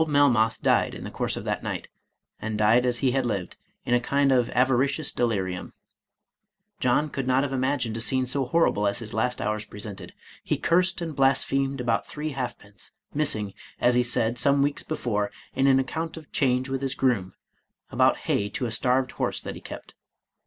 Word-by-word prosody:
Old 160 - +1
Melmoth 125 -7 +3
died - - +2
in - - -8
the - - -6
course - - -2
of - - -5
that - - -2
night, - - -4 0.5
and 110 -1 -3
died 115 +4 +4
as 120 -1 +1
he 130 - +4
had 135 +1 +1
lived, 100 -7 -3 0.3
in 120 - 0
a 125 - +5
kind 140 +3 +2
of 125 -3 +3
avaricious 135 +3 +2
delirium. 95 -6 -2 1.1
John, 125 +5 +2
could 135 -3 -4
not 130 +1 +3
have 140 -1 -2
imagined 130 -3 0
a - - -3
scene 130 +3 +1
so 130 +2 -1
horrible 125 -8 +2
as 100 0 0
his 115 -1 -5
last 125 +2 0
hours 105 0 -1
presented. 105 -1 -9 0.3
He - - 0
cursed 180 +2 +2
and 165 -3 -4
blasphemed 135 0 +1
about 120 -2 0
three 155 +1 -4
halfpence, 120 -6 -6 0.2
missing, 110 -10 0 0.3
as 120 - +4
he 125 - +4
said, 120 -1 0
some 140 +3 +3
weeks 145 0 0
before, 105 -9 -2 0.2
in 135 - +2
an 135 -1 +5
account 160 +5 -3
of 155 -2 -12
change 130 -1 +1
with 135 0 -3
his 135 0 -1
groom, 115 -9 0 0.6
about - - +3
hay 100 0 +1
to 125 - -3
a 115 - -3
starved 125 +3 +1
horse - - -2
that - - -5
he - - -10
kept. - - -9
125 Hz, 195 wpm, -26 LUFS, 110-140 Hz, 1.1 s, a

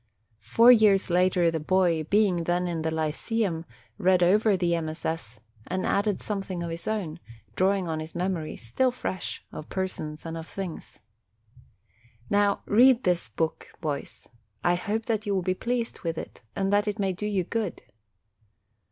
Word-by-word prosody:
Four 230 - +6
years 210 -6 +5
later 180 -1 +3
the 160 - -2
boy, 170 -1 +2
being 190 -2 +2
then 175 +1 +1
in 170 -2 -2
the 160 - 0
lyceum, 160 +3 -1 0.3
read 180 -1 +4
over 205 +3 +4
the 175 -1 +1
MSS. 160 -7 -4 0.3
and 185 +1 -2
added 205 -1 +1
something 195 -4 -4
of 170 - -4
his 165 0 -7
own, 185 -7 -2 0.4
drawing 190 -1 +2
on 160 -1 -2
his 155 +1 -8
mem 185 +2 0
ories, 160 -3 -5
still 190 - +1
fresh, 240 -6 -5
of 155 - -8
persons 155 -5 -4
and 165 0 -4
of 165 0 -7
things. 190 -4 -7 1.3
Now 205 0 +2
read 250 +3 +5
this 180 -2 +1
book, 160 -1 -2
boys; 150 -3 -5 0.4
I 175 - +4
hope 210 +5 -2
that 220 -2 -1
you 200 - +1
will 185 - 0
be 185 +1 +1
pleased 235 +4 -2
with 165 -2 -3
it, - - -7
and 195 0 0
that 205 +1 +3
it 210 0 -1
may 195 -3 0
do 210 +4 -4
you 200 -3 0
good. 210 0 -3
185 Hz, 170 wpm, -27 LUFS, 165-205 Hz, 1.3 s, Four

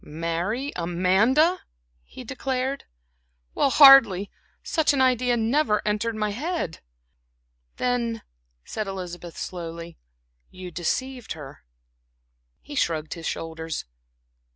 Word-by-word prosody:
"Marry 170 - -3
Amanda!" 190 - +2 0.4
he 255 - -11
declared, 265 +2 -3 0.7
"well, 275 - +2
hardly! 255 -10 +7 0.3
Such 315 -3 +1
an 275 - 0
idea 250 -1 +3
never 230 0 +2
entered 215 +2 0
my 210 -1 -1
head." 295 - -3 1.0
"Then," 235 -2 -1 0.4
said 215 -2 -4
Elizabeth, 175 -3 -7
slowly 170 -1 -7 0.5
"you 185 -1 -9
deceived 245 +9 -3
her." 140 - -11 1.0
He - - -11
shrugged 160 - -1
his 165 -2 -6
shoulders. 160 -1 -5
215 Hz, 100 wpm, -25 LUFS, 170-260 Hz, 1.0 s, hardly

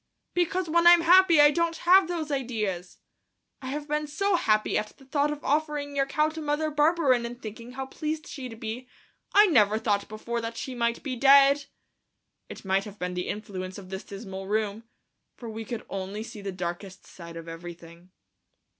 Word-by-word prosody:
"Because 355 +1 0
when 340 +2 +3
I'm 345 -1 +8
happy 350 -1 +6
I 295 0 +8
don't 335 +1 0
have 365 +1 +5
those 330 -3 -3
ideas. 215 -10 -3 0.6
I 260 - -7
have 290 +2 -4
been 300 0 -1
so 395 +6 0
happy 215 -10 +1
at 210 0 -2
the 270 - -18
thought 285 +2 +1
of 295 0 -6
offering 295 -1 -1
your 275 -1 +1
cow 305 +3 +2
to 320 0 -7
Mother 300 +1 -1
Barberin 295 -4 +3
and 240 +1 -6
thinking 230 +2 -9
how 265 +1 -4
pleased 305 +3 -4
she'd 250 -5 -8
be, 230 +3 -6 0.5
I 415 +1 +8
never 215 - +4
thought 205 -2 -1
before 235 +2 -4
that 230 0 -5
she 260 - -5
might 235 -1 -1
be 265 -3 -3
dead." 275 +2 +6 0.8
It - - -10
must 190 +1 +1
have 210 -1 -10
been 180 -1 -3
the 180 0 -3
influence 190 -3 -5
of 190 -2 -11
this 190 0 -5
dismal 195 -2 -8
room, 215 +1 -2 0.5
for 235 - -9
we 225 +1 -6
could 225 0 -6
only 195 +2 -5
see 225 -2 -9
the 195 -1 -4
darkest 180 +1 -6
side 170 -2 -11
of 165 0 -9
everything. 170 +1 -10
245 Hz, 190 wpm, -27 LUFS, 200-300 Hz, 0.8 s, I'm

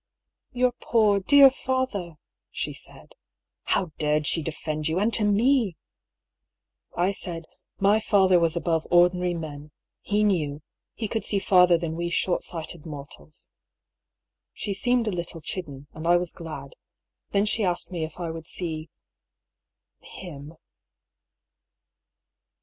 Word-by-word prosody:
" - - -63
Your 250 0 +2
poor, 215 -4 +3
dear 275 +6 +7
father! 260 -11 -2 0.2
" - - -63
she - - -3
said. - - -15 0.5
How 180 -4 0
dared 150 0 +1
she 165 - +3
defend 155 0 -3
you, 160 +2 -1
and 215 +4 +1
to 220 - +5
me 210 - +2 1.2
I 175 +2 +2
I - - +1
said: 170 -4 -5 0.2
" - - -60
My 215 +2 +5
father 190 -4 +4
was 165 -1 +1
above 165 -1 0
ordinary 175 0 +3
men. 150 -2 -7 0.3
He 210 +1 +1
knew 155 -8 0 0.2
— - - -63
he 220 - -3
could 225 +1 -2
see 205 - -1
farther 180 -3 +5
than 165 -1 -4
we 170 +1 -2
short 175 +1 0
sighted 165 -1 -6
mor 145 -4 -7
tals." 155 - -18 1.0
She 205 - -3
seemed 245 +4 +1
a - - +1
little 170 -2 -4
chidden, 150 -4 -6
and 160 +1 -6
I 175 0 +6
was 175 -1 -3
glad. 145 -5 -8 0.6
Then 200 +1 +2
she 215 +1 0
asked 180 -1 -1
me 170 -3 -3
if 160 +3 -7
I 170 -2 -3
would 165 0 -8
see 160 -3 -5 0.6
— - - -62 0.2
him. 155 -3 -9
175 Hz, 155 wpm, -25 LUFS, 160-205 Hz, 1.2 s, dear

